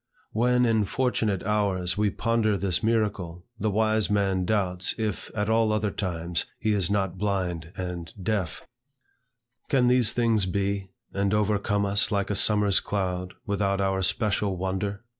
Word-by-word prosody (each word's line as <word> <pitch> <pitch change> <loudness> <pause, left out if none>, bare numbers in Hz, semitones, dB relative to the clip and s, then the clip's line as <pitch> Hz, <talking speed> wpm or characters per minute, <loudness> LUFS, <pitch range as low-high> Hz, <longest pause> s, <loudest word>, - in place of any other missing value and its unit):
When 125 +2 +2
in 110 -3 +2
fortunate 110 -4 0
hours 100 -4 0
we 105 0 +1
ponder 110 0 0
this 95 -3 +1
miracle, 105 -6 -1
the 110 - 0
wise 110 +1 +1
man 95 -3 +1
doubts, 95 -3 0
if, 110 -4 -3
at 105 -1 -1
all 110 0 +2
other 105 -1 0
times, 85 -3 -2
he 110 -1 0
is 95 -5 +1
not 95 -3 -1
blind 90 -5 -2
and 90 -2 -5
deaf; 95 -3 -2 1.0
"Can 130 -3 +3
these 125 -3 +5
things 115 -5 +1
be, 100 +1 -2 0.2
And 100 +1 +1
overcome 105 -1 +1
us 100 +2 +2
like 100 0 0
a - - 0
summer's 105 -1 +4
cloud, 90 -2 -3
Without 100 -1 0
our 95 -1 0
special 100 0 0
wonder?" 95 +3 -3
100 Hz, 150 wpm, -26 LUFS, 95-110 Hz, 1.0 s, these